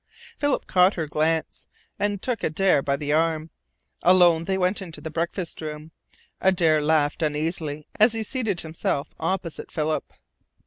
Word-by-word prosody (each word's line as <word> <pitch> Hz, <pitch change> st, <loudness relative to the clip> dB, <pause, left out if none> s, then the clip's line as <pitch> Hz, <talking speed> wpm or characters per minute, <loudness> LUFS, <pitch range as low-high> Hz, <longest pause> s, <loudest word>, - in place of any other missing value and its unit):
Philip 290 Hz, -2 st, 0 dB
caught 185 Hz, +2 st, +4 dB
her 165 Hz, -, -2 dB
glance, 155 Hz, +2 st, -1 dB, 0.3 s
and 205 Hz, -1 st, -1 dB
took 250 Hz, -3 st, -1 dB
Adare 160 Hz, -1 st, +2 dB
by 140 Hz, 0 st, 0 dB
the 145 Hz, +1 st, -1 dB
arm. 160 Hz, 0 st, +1 dB, 0.5 s
Alone 175 Hz, -2 st, +5 dB
they 190 Hz, +1 st, 0 dB
went 185 Hz, +2 st, +1 dB
into 165 Hz, -5 st, -7 dB
the 155 Hz, +1 st, -7 dB
breakfast 170 Hz, +2 st, -3 dB
room. 155 Hz, 0 st, -7 dB, 0.5 s
Adare 165 Hz, -5 st, +3 dB
laughed 150 Hz, 0 st, +1 dB
uneasily 155 Hz, -1 st, -2 dB
as 215 Hz, +2 st, +6 dB
he 225 Hz, -1 st, -2 dB
seated 220 Hz, -6 st, -2 dB
himself 155 Hz, -2 st, -3 dB
opposite 170 Hz, 0 st, -3 dB
Philip. 155 Hz, 0 st, -2 dB
165 Hz, 145 wpm, -24 LUFS, 155-185 Hz, 0.5 s, as